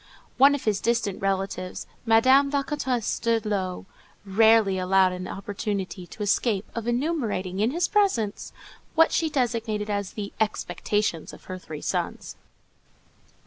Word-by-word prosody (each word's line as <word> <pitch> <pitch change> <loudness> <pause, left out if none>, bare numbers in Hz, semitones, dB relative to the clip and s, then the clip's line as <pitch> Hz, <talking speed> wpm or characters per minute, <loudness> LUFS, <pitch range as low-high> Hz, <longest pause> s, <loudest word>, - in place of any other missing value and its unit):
One 280 +2 +7
of 285 - -6
his 210 -3 0
distant 230 -5 0
relatives, 195 -1 -2 0.2
Madame 260 +5 +5
la 280 0 0
Comtesse 260 -6 -2
de 230 0 +2
Lô, 190 -4 -3 0.4
rarely 215 -1 +4
allowed 185 0 +3
an 180 0 -5
opportunity 195 -2 -4
to 210 - -7
escape 205 0 +1
of 230 -1 -4
enumerating, 240 - -1
in 215 +3 +3
his 340 +6 0
presence, 375 - 0 0.4
what 325 0 +5
she 325 -1 +1
designated 230 -6 -1
as 200 -2 -2
"the 205 -2 -6
expectations" 210 -3 -1
of - - -13
her 185 0 -7
three 155 -4 -8
sons. - - -3
215 Hz, 140 wpm, -25 LUFS, 195-240 Hz, 0.4 s, One